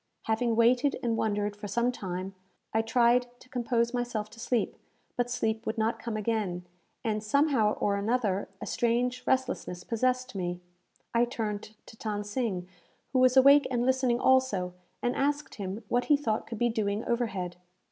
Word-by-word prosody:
Having 225 Hz, +1 st, +1 dB
waited 245 Hz, +4 st, +3 dB
and 230 Hz, -2 st, +1 dB
wondered 205 Hz, -2 st, 0 dB
for 205 Hz, 0 st, -7 dB
some 235 Hz, +5 st, +1 dB
time, 185 Hz, -4 st, -5 dB, 0.4 s
I 220 Hz, -, +3 dB
tried 240 Hz, +2 st, +3 dB
to -, -, -17 dB
compose 235 Hz, -1 st, 0 dB
myself 240 Hz, -4 st, -2 dB
to 230 Hz, -, -14 dB
sleep; 235 Hz, -1 st, 0 dB, 0.4 s
but 245 Hz, 0 st, 0 dB
sleep 220 Hz, -2 st, -1 dB
would 220 Hz, -, -2 dB
not 225 Hz, +1 st, 0 dB
come 230 Hz, -2 st, -3 dB
again, 210 Hz, -5 st, -1 dB, 0.4 s
and, 215 Hz, -1 st, 0 dB
somehow 245 Hz, -2 st, +3 dB
or 200 Hz, -1 st, 0 dB
another, 205 Hz, -2 st, 0 dB
a -, -, -5 dB
strange 245 Hz, +2 st, 0 dB
restlessness 260 Hz, -9 st, 0 dB
possessed 255 Hz, +3 st, 0 dB
me. 175 Hz, -2 st, -3 dB, 0.5 s
I 235 Hz, +1 st, +4 dB
turned 215 Hz, -3 st, -4 dB
to -, -, -13 dB
Than 210 Hz, -2 st, -3 dB
Sing, 205 Hz, -4 st, -2 dB, 0.5 s
who 260 Hz, -, +3 dB
was 255 Hz, 0 st, +5 dB
awake 280 Hz, +2 st, +7 dB
and 245 Hz, -1 st, 0 dB
listening 260 Hz, -2 st, +2 dB
also, 255 Hz, -10 st, +2 dB, 0.3 s
and 245 Hz, -, +1 dB
asked 285 Hz, 0 st, 0 dB
him 195 Hz, +4 st, -4 dB
what 245 Hz, +2 st, +1 dB
he 295 Hz, -, +5 dB
thought 225 Hz, -7 st, -1 dB
could 230 Hz, -, -5 dB
be 240 Hz, +2 st, +2 dB
doing 215 Hz, -1 st, -1 dB
overhead? 195 Hz, -7 st, -2 dB
230 Hz, 170 wpm, -29 LUFS, 210-250 Hz, 0.5 s, awake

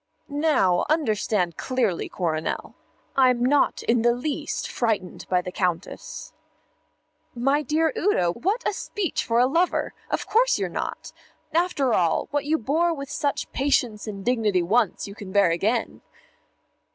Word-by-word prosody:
"Now, 190 Hz, -, +3 dB
understand 215 Hz, -, 0 dB
clearly, 240 Hz, -9 st, -1 dB
Coronel, 160 Hz, -3 st, -2 dB, 0.4 s
I'm 250 Hz, -2 st, +4 dB
not 285 Hz, +2 st, +2 dB
in 230 Hz, 0 st, +2 dB
the 240 Hz, +1 st, +4 dB
least 300 Hz, +4 st, -3 dB
frightened 215 Hz, -6 st, -2 dB
by 180 Hz, -1 st, +2 dB
the 180 Hz, -, -5 dB
Countess." 180 Hz, -1 st, -3 dB, 1.0 s
"My 275 Hz, +5 st, +2 dB
dear 310 Hz, +1 st, +1 dB
Udo, 180 Hz, -, +2 dB
what 390 Hz, -, -1 dB
a -, -, 0 dB
speech 390 Hz, -3 st, -2 dB
for 230 Hz, -, 0 dB
a 245 Hz, -, +5 dB
lover! 335 Hz, +7 st, +1 dB, 0.2 s
Of -, -, -1 dB
course -, -, +3 dB
you're -, -, -2 dB
not. -, -, -5 dB, 0.4 s
After 315 Hz, -7 st, +1 dB
all, 170 Hz, -5 st, +1 dB
what 290 Hz, -1 st, -1 dB
you 310 Hz, +2 st, +2 dB
bore 325 Hz, +7 st, +1 dB
with 280 Hz, 0 st, -7 dB
such 290 Hz, -1 st, -2 dB
patience 250 Hz, -6 st, 0 dB
and 200 Hz, -2 st, -6 dB
dignity 215 Hz, -7 st, +2 dB
once, 210 Hz, +3 st, +1 dB
you 200 Hz, -, -8 dB
can 200 Hz, -2 st, -9 dB
bear 200 Hz, -3 st, +4 dB
again." 220 Hz, +7 st, -1 dB
245 Hz, 145 wpm, -24 LUFS, 200-295 Hz, 1.0 s, a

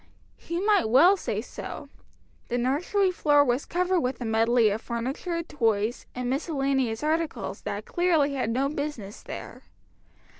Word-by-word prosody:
"] -, -, -35 dB
He 340 Hz, +1 st, -1 dB
might 405 Hz, -, +3 dB
well 325 Hz, -, +6 dB
say -, -, -3 dB
so. -, -, -8 dB, 0.6 s
The 245 Hz, -, -1 dB
nursery 330 Hz, +10 st, +1 dB
floor 290 Hz, -4 st, +4 dB
was 250 Hz, +2 st, 0 dB
covered 360 Hz, +1 st, +1 dB
with 250 Hz, -4 st, -2 dB
a 245 Hz, -, -4 dB
medley 225 Hz, 0 st, +3 dB
of 215 Hz, +3 st, -3 dB
furniture, 270 Hz, +9 st, -3 dB
toys, 225 Hz, -6 st, -1 dB
and 250 Hz, 0 st, -3 dB
miscellaneous 270 Hz, -4 st, -1 dB
articles 320 Hz, +1 st, -2 dB
that -, -, -5 dB
clearly 330 Hz, -5 st, +2 dB
had 260 Hz, -5 st, -1 dB
no 260 Hz, +4 st, +1 dB
business 285 Hz, -8 st, -5 dB
there. -, -, -8 dB
275 Hz, 150 wpm, -26 LUFS, 240-335 Hz, 0.6 s, well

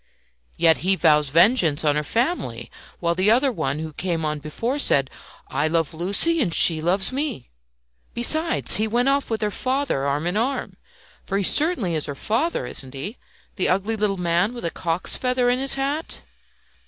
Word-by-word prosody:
"Yet 165 Hz, -1 st, +4 dB
he 190 Hz, +2 st, +1 dB
vows 150 Hz, -5 st, +3 dB
vengeance 170 Hz, -, +3 dB
on 145 Hz, -1 st, +2 dB
her 150 Hz, -, -1 dB
family, 245 Hz, -, -3 dB, 0.3 s
while 170 Hz, -1 st, 0 dB
the 185 Hz, +4 st, +1 dB
other 260 Hz, +4 st, +3 dB
one 160 Hz, -, -3 dB
who 155 Hz, 0 st, -6 dB
came 165 Hz, -1 st, -3 dB
on 150 Hz, 0 st, -2 dB
before 230 Hz, -, -4 dB
said, 135 Hz, -, +3 dB, 0.4 s
'I 150 Hz, -, -1 dB
love 165 Hz, 0 st, -1 dB
Lucie 200 Hz, -, +2 dB
and 195 Hz, -9 st, 0 dB
she 165 Hz, -1 st, +5 dB
loves 190 Hz, +6 st, +1 dB
me!' 270 Hz, -, -4 dB, 0.6 s
Besides, 315 Hz, +7 st, +2 dB
he 215 Hz, +1 st, 0 dB
went 240 Hz, +4 st, +1 dB
off 280 Hz, 0 st, 0 dB
with 220 Hz, -1 st, -2 dB
her 210 Hz, -, -1 dB
father 255 Hz, -, -2 dB
arm 145 Hz, +3 st, -2 dB
in 175 Hz, +4 st, -1 dB
arm. 255 Hz, +4 st, -2 dB, 0.5 s
For 195 Hz, -, -3 dB
he 200 Hz, -, -1 dB
certainly 275 Hz, -, +2 dB
is 155 Hz, -2 st, -2 dB
her 145 Hz, -, -5 dB
father, 240 Hz, -, -2 dB
isn't 135 Hz, 0 st, -5 dB
he 200 Hz, -, -7 dB, 0.4 s
the 185 Hz, -, 0 dB
ugly 195 Hz, +5 st, 0 dB
little 205 Hz, -2 st, -1 dB
man 180 Hz, +6 st, 0 dB
with 240 Hz, -, -7 dB
a 165 Hz, -, -2 dB
cock's 170 Hz, 0 st, -1 dB
feather 250 Hz, -1 st, +1 dB
in 250 Hz, -, 0 dB
his 270 Hz, 0 st, +4 dB
hat?" 280 Hz, +4 st, -3 dB
195 Hz, 185 wpm, -22 LUFS, 160-250 Hz, 0.6 s, she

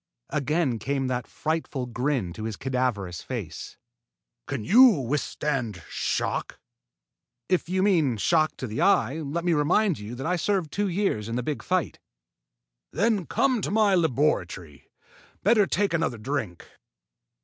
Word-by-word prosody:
Again 145 Hz, -3 st, 0 dB
came 135 Hz, +4 st, -1 dB
that 125 Hz, -1 st, -2 dB
frightful 155 Hz, -4 st, -3 dB
grin 120 Hz, -6 st, -1 dB
to 110 Hz, +4 st, -6 dB
his 110 Hz, -2 st, -3 dB
cadaverous 125 Hz, -9 st, -2 dB
face. 100 Hz, -12 st, -6 dB, 0.7 s
"Can 135 Hz, -5 st, -3 dB
you 230 Hz, -, +7 dB
withstand 135 Hz, -, -2 dB
shock?" -, -, -2 dB, 0.9 s
"If 185 Hz, -2 st, 0 dB
you 185 Hz, +1 st, +1 dB
mean 160 Hz, -, +3 dB
shock 155 Hz, +7 st, +2 dB
to -, -, -4 dB
the 110 Hz, -2 st, -3 dB
eye, 130 Hz, +8 st, +3 dB
let 160 Hz, +3 st, -3 dB
me 175 Hz, -, +3 dB
remind 165 Hz, -, +2 dB
you 105 Hz, +4 st, -7 dB
that 135 Hz, -, -6 dB
I 180 Hz, +2 st, +1 dB
served 185 Hz, -3 st, 0 dB
two 205 Hz, 0 st, 0 dB
years 175 Hz, -, -1 dB
in 115 Hz, -, -3 dB
the 125 Hz, -, -1 dB
big 150 Hz, +3 st, -3 dB
fight." 185 Hz, -3 st, -1 dB, 0.9 s
"Then 210 Hz, -5 st, +1 dB
come 260 Hz, -5 st, +1 dB
to -, -, -2 dB
my 210 Hz, -1 st, +3 dB
laboratory. 140 Hz, -, 0 dB, 0.5 s
Better 210 Hz, -1 st, +4 dB
take 200 Hz, -3 st, 0 dB
another 160 Hz, -7 st, 0 dB
drink." 110 Hz, -6 st, -4 dB
145 Hz, 145 wpm, -26 LUFS, 120-180 Hz, 0.9 s, you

